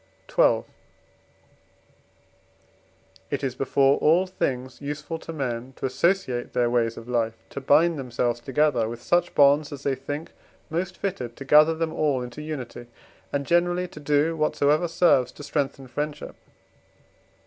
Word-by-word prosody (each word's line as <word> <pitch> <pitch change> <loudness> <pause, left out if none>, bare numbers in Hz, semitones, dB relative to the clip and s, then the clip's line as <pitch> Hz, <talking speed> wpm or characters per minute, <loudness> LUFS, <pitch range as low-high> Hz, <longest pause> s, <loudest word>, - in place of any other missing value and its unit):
XII. - - +4 2.7
It - - -3
is 130 -2 -1
before 135 +1 +2
all 170 +5 +4
things 130 -9 -3
useful 150 +3 -5
to 165 - -8
men 130 -4 -4
to - - -5
associate 135 -1 0
their 120 -1 +1
ways 115 -2 +1
of 115 - -9
life, 115 -2 0 0.2
to 140 - -5
bind 155 +4 +3
themselves 120 -2 -1
together 130 -3 +1
with 120 0 -6
such 175 0 +1
bonds 145 +1 +4
as 140 -1 -8
they 140 - +1
think 145 +4 -6 0.4
most 175 +3 -2
fitted 125 - -4
to 135 - -8
gather 155 +3 +6
them 160 0 -2
all 140 -5 0
into 125 +4 -8
unity, 130 -6 -6 0.4
and 140 0 -1
generally 175 +2 +2
to - - -11
do 150 +2 +1
whatsoever 155 +1 +2
serves 150 -7 +3
to 145 - -11
strengthen 140 -2 -2
friendship. 145 +4 -5
145 Hz, 145 wpm, -25 LUFS, 125-160 Hz, 2.7 s, gather